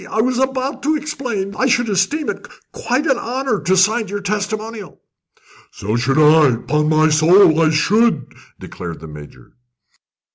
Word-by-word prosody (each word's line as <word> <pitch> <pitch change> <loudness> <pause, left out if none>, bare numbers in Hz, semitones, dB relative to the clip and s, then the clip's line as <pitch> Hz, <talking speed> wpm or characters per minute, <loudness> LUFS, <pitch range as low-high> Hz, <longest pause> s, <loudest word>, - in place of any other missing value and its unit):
I - - -3
was 250 +2 0
about 265 +1 -2
to 310 +2 0
explain 255 -10 -4
that - - -12
I 260 - +2
should 245 -1 +1
esteem 215 - -1
it - - -11 0.3
quite 255 +5 -2
an 265 -5 +1
honour 250 -2 -2
to 190 +2 +1
sign 215 +4 +2
your 205 +1 -5
testimonial." 210 -1 -5 0.7
"So 105 +3 -4
should 130 +4 0
I 155 0 +5
upon 150 +6 -1
my 155 0 +3
soul, 160 +2 +4
I 160 - +3
should!" 215 +9 +1 0.3
declared 85 -2 -8
the 80 - -11
Major. 75 -1 -13
205 Hz, 160 wpm, -18 LUFS, 155-245 Hz, 0.7 s, I